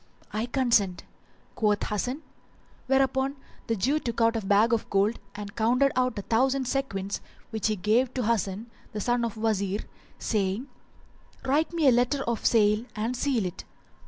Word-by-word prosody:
"I 220 Hz, +3 st, -1 dB
consent," 235 Hz, -8 st, +2 dB, 0.5 s
quoth 210 Hz, -2 st, +1 dB
Hasan, 250 Hz, +8 st, -2 dB, 0.6 s
whereupon 270 Hz, +1 st, +2 dB, 0.3 s
the 230 Hz, -, +1 dB
Jew 270 Hz, +9 st, +1 dB
took 235 Hz, -5 st, -4 dB
out 230 Hz, 0 st, +3 dB
a 225 Hz, -, 0 dB
bag 205 Hz, +3 st, +4 dB
full -, -, +5 dB
of -, -, -12 dB
gold 200 Hz, +4 st, +2 dB, 0.2 s
and 205 Hz, 0 st, -7 dB
counted 250 Hz, +5 st, +3 dB
out 255 Hz, -2 st, +1 dB
a 205 Hz, -, -3 dB
thousand 260 Hz, +4 st, +1 dB
sequins 200 Hz, -8 st, -2 dB, 0.3 s
which 220 Hz, -2 st, 0 dB
he 215 Hz, -, +1 dB
gave 220 Hz, +6 st, +2 dB
to 255 Hz, -, 0 dB
Hasan, 220 Hz, 0 st, -1 dB, 0.2 s
the 210 Hz, -, -3 dB
son 240 Hz, +2 st, +1 dB
of 230 Hz, -2 st, -2 dB
the 215 Hz, -, -8 dB
Wazir, 205 Hz, -2 st, 0 dB, 0.4 s
saying, 205 Hz, +2 st, -1 dB, 0.8 s
"Write 295 Hz, +5 st, +2 dB
me 330 Hz, -4 st, +2 dB
a -, -, +8 dB
letter 250 Hz, +3 st, +2 dB
of 235 Hz, -1 st, -2 dB
sale 210 Hz, -1 st, +3 dB
and 225 Hz, +3 st, -1 dB
seal 245 Hz, -5 st, 0 dB
it." 180 Hz, -, -5 dB
230 Hz, 170 wpm, -27 LUFS, 210-255 Hz, 0.8 s, a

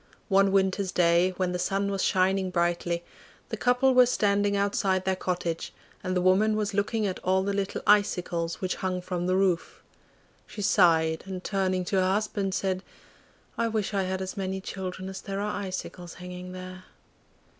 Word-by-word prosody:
One 195 Hz, 0 st, +4 dB
winter's 190 Hz, 0 st, +1 dB
day, 175 Hz, +1 st, +3 dB
when 185 Hz, -1 st, 0 dB
the 180 Hz, -, -2 dB
sun 200 Hz, +2 st, 0 dB
was 195 Hz, -1 st, -1 dB
shining 190 Hz, 0 st, +2 dB
brightly, 170 Hz, -1 st, 0 dB, 0.5 s
the -, -, -2 dB
couple 250 Hz, +2 st, +3 dB
were 250 Hz, -1 st, +7 dB
standing 205 Hz, -3 st, +2 dB
outside 195 Hz, -2 st, +1 dB
their 190 Hz, 0 st, +1 dB
cottage, 175 Hz, -3 st, -3 dB, 0.3 s
and 185 Hz, -1 st, -1 dB
the 180 Hz, -, +1 dB
woman 205 Hz, +4 st, +4 dB
was 210 Hz, -1 st, -1 dB
looking 210 Hz, +2 st, 0 dB
at 190 Hz, -2 st, -2 dB
all 190 Hz, +1 st, +1 dB
the 200 Hz, +1 st, -1 dB
little 200 Hz, -1 st, -2 dB
icicles 180 Hz, -5 st, +2 dB
which 185 Hz, -1 st, -2 dB
hung 185 Hz, -1 st, -2 dB
from 180 Hz, -1 st, -3 dB
the 185 Hz, -, +2 dB
roof. 185 Hz, -3 st, 0 dB, 0.6 s
She 205 Hz, -, -6 dB
sighed, 160 Hz, -5 st, +3 dB
and 185 Hz, -1 st, -6 dB
turning 185 Hz, -2 st, 0 dB
to 195 Hz, -, 0 dB
her 185 Hz, 0 st, +3 dB
husband 200 Hz, -2 st, -1 dB
said, 185 Hz, -1 st, -1 dB, 0.8 s
'I 230 Hz, -, +2 dB
wish 215 Hz, -2 st, -2 dB
I 200 Hz, -, +1 dB
had 190 Hz, 0 st, -2 dB
as 190 Hz, -, -6 dB
many 190 Hz, -1 st, -3 dB
children 190 Hz, -1 st, -6 dB
as 190 Hz, 0 st, -6 dB
there 195 Hz, -1 st, -4 dB
are 205 Hz, 0 st, -2 dB
icicles 185 Hz, -2 st, -6 dB
hanging 180 Hz, 0 st, -8 dB
there. 185 Hz, 0 st, -9 dB
190 Hz, 175 wpm, -27 LUFS, 180-200 Hz, 0.8 s, were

